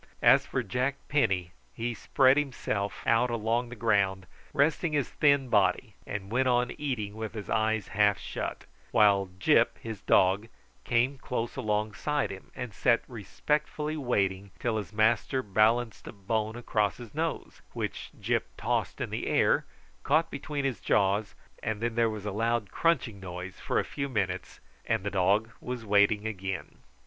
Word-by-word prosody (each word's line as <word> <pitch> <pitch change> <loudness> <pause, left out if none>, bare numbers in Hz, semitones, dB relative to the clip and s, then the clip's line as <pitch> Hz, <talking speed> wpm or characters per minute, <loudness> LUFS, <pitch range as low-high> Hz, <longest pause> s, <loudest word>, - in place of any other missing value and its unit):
As - - +6
for 130 - -1
Jack 125 +6 -1
Penny, 95 -12 +1 0.2
he 120 +1 -2
spread 130 +4 +4
himself 120 -8 -2
out 115 +2 +3
along 115 +1 0
the 120 - -8
ground, 100 -4 +1 0.3
resting 150 +2 +1
his 145 -3 0
thin 140 -3 +3
body, 105 +1 +2
and 100 -1 -5
went 130 +2 +2
on 125 -1 +2
eating 120 -8 -2
with 110 0 -6
his 105 -2 -6
eyes 110 -2 +1
half 105 -1 +3
shut; - - -5 0.2
while 100 -2 +4
Gyp, 95 - +3
his 110 -3 -7
dog, 95 +4 +3 0.4
came 125 +3 +1
close 120 -2 -3
alongside 110 +7 -1
him, 95 -1 -10
and 125 -4 -5
sat 120 +3 +2
respectfully 150 +6 -2
waiting 100 -8 0
till 115 -2 -1
his 105 - -5
master 115 +4 +2
balanced 110 +3 +1
a - - -5
bone 110 +2 -2
across 105 -4 0
his 120 -3 -11
nose, 160 +2 -3
which - - -4
Gyp - - +1 0.2
tossed - - -1
in - - -3
the - - -3
air, - - +3 0.4
caught 160 - +2
between 140 0 -3
his 130 -8 -1
jaws, 100 +1 +1 0.3
and 110 -1 -2
then 120 +1 -1
there 115 0 +2
was 105 -2 -6
a 105 - -2
loud 115 +1 0
crunching 135 -11 +1
noise 90 0 -7
for - - -1
a - - +2
few 140 -1 -4
minutes, 95 -7 -2 0.2
and 110 -3 0
the 100 - -2
dog 100 +4 +2
was 125 -2 -5
waiting 105 +1 +3
again. 95 -3 -4
110 Hz, 160 wpm, -29 LUFS, 100-125 Hz, 0.4 s, As